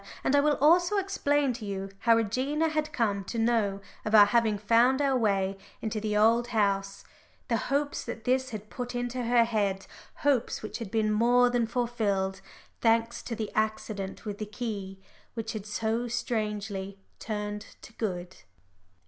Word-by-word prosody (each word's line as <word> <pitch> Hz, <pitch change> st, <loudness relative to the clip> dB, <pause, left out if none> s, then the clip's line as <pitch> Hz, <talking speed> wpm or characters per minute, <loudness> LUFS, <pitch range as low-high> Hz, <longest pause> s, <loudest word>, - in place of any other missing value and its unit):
And 275 Hz, -, +2 dB
I -, -, +6 dB
will 295 Hz, +1 st, +3 dB
also 350 Hz, +7 st, +4 dB
explain 290 Hz, -9 st, +1 dB
to 235 Hz, -1 st, -8 dB
you 195 Hz, -1 st, -4 dB
how 230 Hz, 0 st, +4 dB
Regina 260 Hz, +9 st, 0 dB
had 305 Hz, 0 st, -1 dB
come 210 Hz, -8 st, 0 dB
to 230 Hz, -, -5 dB
know 225 Hz, -4 st, +1 dB, 0.2 s
of 215 Hz, +1 st, +1 dB
our 205 Hz, -1 st, +10 dB
having 220 Hz, 0 st, +2 dB
found 235 Hz, +5 st, +3 dB
our 275 Hz, -2 st, +2 dB
way 195 Hz, -4 st, +1 dB, 0.2 s
into 220 Hz, -1 st, -3 dB
the 210 Hz, -1 st, 0 dB
Old 230 Hz, +3 st, +4 dB
House, 200 Hz, -3 st, 0 dB, 0.5 s
the 230 Hz, -, +2 dB
hopes 285 Hz, +1 st, 0 dB
that 225 Hz, -, -6 dB
this 260 Hz, +1 st, +1 dB
had 215 Hz, -3 st, -8 dB
put 245 Hz, 0 st, -5 dB
into 245 Hz, +1 st, -2 dB
her 240 Hz, 0 st, +4 dB
head 205 Hz, -4 st, -1 dB, 0.4 s
hopes 265 Hz, -6 st, +1 dB
which 215 Hz, -, -5 dB
had 230 Hz, -4 st, -5 dB
been 215 Hz, 0 st, +1 dB
more 245 Hz, +3 st, +4 dB
than 240 Hz, -2 st, +1 dB
fulfilled, 210 Hz, -5 st, -1 dB, 0.4 s
thanks 230 Hz, 0 st, +2 dB
to 230 Hz, -, -5 dB
the 215 Hz, -1 st, -4 dB
accident 215 Hz, -2 st, -2 dB
with 205 Hz, -1 st, -5 dB
the 215 Hz, -, -4 dB
key, 210 Hz, -4 st, -5 dB, 0.4 s
which 225 Hz, -1 st, -4 dB
had 215 Hz, -2 st, -6 dB
so 225 Hz, +3 st, -1 dB
strangely 210 Hz, -4 st, -3 dB, 0.2 s
turned 210 Hz, -1 st, -4 dB, 0.2 s
to 225 Hz, -, -12 dB
good. 185 Hz, -5 st, -4 dB
225 Hz, 165 wpm, -28 LUFS, 205-245 Hz, 0.5 s, our